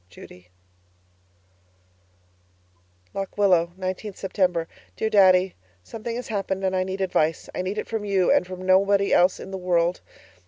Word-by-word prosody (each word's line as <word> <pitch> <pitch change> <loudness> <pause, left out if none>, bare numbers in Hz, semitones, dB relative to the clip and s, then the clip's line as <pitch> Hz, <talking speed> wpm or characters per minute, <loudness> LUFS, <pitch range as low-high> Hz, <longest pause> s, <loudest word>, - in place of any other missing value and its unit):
Judy 90 0 -15 2.6
LOCK 195 -1 -5
WILLOW, 180 -4 +3
19th 185 +2 -5
September 180 -4 0 0.3
Dear 220 - -1
Daddy, 185 -2 +5 0.3
Something 230 - -6
has 245 0 -6
happened 195 -2 -2
and 190 0 0
I 185 - +1
need 190 +1 -5
advice. 165 -4 0
I - - -2
need 190 +3 -4
it - - -3
from 225 -2 -3
you, 195 -3 +2
and 180 - +3
from 185 0 -8
nobody 195 +1 +3
else 180 +1 +4
in 190 - -9
the 190 - -5
world. 175 -1 +1
190 Hz, 150 wpm, -24 LUFS, 180-200 Hz, 2.6 s, Daddy